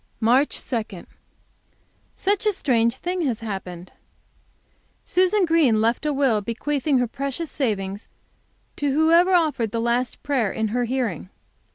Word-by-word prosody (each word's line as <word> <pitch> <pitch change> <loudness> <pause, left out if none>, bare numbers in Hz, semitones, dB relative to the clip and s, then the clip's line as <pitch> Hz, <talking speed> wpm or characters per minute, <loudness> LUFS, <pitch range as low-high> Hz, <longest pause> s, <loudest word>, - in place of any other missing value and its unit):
March 250 +6 +2
2. 220 -7 -4 1.1
Such 405 +2 0
a 420 - +3
strange 235 -8 +1
thing 360 +6 -3
has 235 -3 -2
happened! 185 -5 -6 1.1
Susan 370 +2 +2
Green 315 -10 +3
left 230 +7 0
a - - +1
will, 270 -7 +1
bequeathing 270 +6 -1
her 250 - +2
precious 275 +6 -4
savings 205 -6 -3 0.7
to 290 -1 0
whoever 335 +5 +4
offered 305 -10 +1
the 230 - -3
last 235 +2 -1
prayer 255 -9 0
in 220 -1 -2
her 245 +3 0
hearing! 230 - -3
250 Hz, 135 wpm, -23 LUFS, 225-305 Hz, 1.1 s, whoever